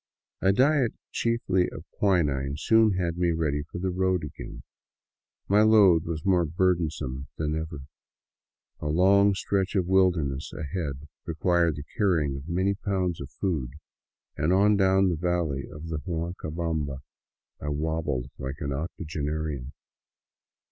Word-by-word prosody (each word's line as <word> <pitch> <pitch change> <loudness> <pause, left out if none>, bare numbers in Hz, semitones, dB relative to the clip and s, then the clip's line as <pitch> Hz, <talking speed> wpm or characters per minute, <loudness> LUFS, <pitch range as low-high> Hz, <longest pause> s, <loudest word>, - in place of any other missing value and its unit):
A 95 - +4
diet 130 +3 +3 0.2
chiefly 105 -6 +1
of - - -10
quinine 70 -8 +1
soon 110 +4 +4
had 90 -2 -2
me 85 -1 +2
ready 75 -3 0
for 75 +4 -8
the 95 +1 -1
road 95 -1 +1
again. 75 - -8 0.8
My 105 +2 +4
load 100 -7 +6
was 80 -2 -4
more 90 -3 +4
burdensome 80 -6 -1
than 75 0 -1
ever. 80 -2 -4 1.0
A - - -4
long 100 +5 +4
stretch 100 0 -1
of 95 -3 +2
wilderness 85 -7 +1
ahead 75 -3 -4 0.2
required 85 -1 +2
the 70 - -6
carrying 80 -9 +1
of 70 +4 -8
many 95 +3 +1
pounds 95 -4 -2
of 70 - -7
food, 75 -11 -2 0.6
and 80 +3 +1
on 100 +3 +5
down 95 -1 +4
the 85 - 0
valley 85 -5 -1
of 75 +2 -9
the 80 -2 -2
Huancabamba 80 -2 -3 0.6
I 75 - -3
wobbled 75 -3 -2
like 65 +1 -5
an 70 -1 -2
octogenarian. 75 -3 -4
85 Hz, 135 wpm, -27 LUFS, 75-95 Hz, 1.0 s, load